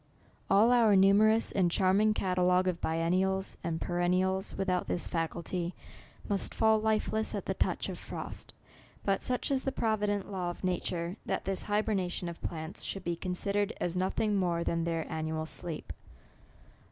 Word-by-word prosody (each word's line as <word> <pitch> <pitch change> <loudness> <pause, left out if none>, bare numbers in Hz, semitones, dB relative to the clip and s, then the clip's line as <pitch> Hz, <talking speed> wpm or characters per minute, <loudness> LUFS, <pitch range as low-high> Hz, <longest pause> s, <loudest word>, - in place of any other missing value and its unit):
All 215 +5 +5
our 230 -4 +5
numerous 210 +4 +5
and 185 -3 +2
charming 195 +4 +3
catalogue 180 -1 +2
of 180 -2 -1
biennials 185 +4 0
and 165 -1 -2
pe - - -5
rennials, 185 +2 +1
without 185 -2 0
this 175 - 0
faculty, 170 +1 -3 0.5
must 200 -1 -1
fall 220 -1 +4
lifeless 220 0 0
at - - -4
the - - -1
touch - - -1
of - - -6
frost. - - -6 0.5
But 195 -1 +1
such 250 +2 -1
is 265 -1 +1
the 270 - -1
provi 215 -4 0
dent 205 -1 -2
law 180 -2 -2
of 175 - -8
nature, 180 0 -2
that 190 - -1
this 195 0 -1
hybernation 205 -4 0
of 170 - -9
plants 160 0 -5
should 195 - -4
be 175 -1 -1
considered 200 +4 -1
as 175 0 -1
nothing 190 +3 0
more 175 -3 +1
than 170 0 0
their 165 -1 -1
annual 160 0 -3
sleep. 160 -1 -4
185 Hz, 165 wpm, -31 LUFS, 175-205 Hz, 0.5 s, All